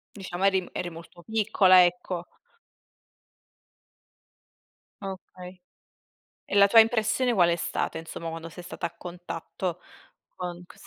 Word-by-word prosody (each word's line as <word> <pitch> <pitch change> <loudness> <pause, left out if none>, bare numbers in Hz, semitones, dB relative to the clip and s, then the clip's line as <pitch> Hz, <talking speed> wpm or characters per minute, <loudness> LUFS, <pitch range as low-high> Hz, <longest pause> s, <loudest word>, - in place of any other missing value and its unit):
Diciamo 190 -2 -3
eri 190 -1 +4
m 180 - -12
eri 175 - -3
molto 165 +1 -13
piccola, 200 -4 +5
ecco. 175 0 -3 2.7
Okay. 185 -2 -9 0.8
E - - -4
la 200 0 +7
tua 225 +3 +7
impressione 225 +2 +3
qual 175 -5 +4
è 170 - +2
stata, 170 - -2
insomma, 165 0 -7
quando 165 0 -7
sei 175 +2 -11
stata 175 - -4
a 170 - -19
contatto, 175 0 -6 0.6
con 180 -1 -6
ques - - -16
180 Hz, 125 wpm, -27 LUFS, 175-195 Hz, 2.7 s, la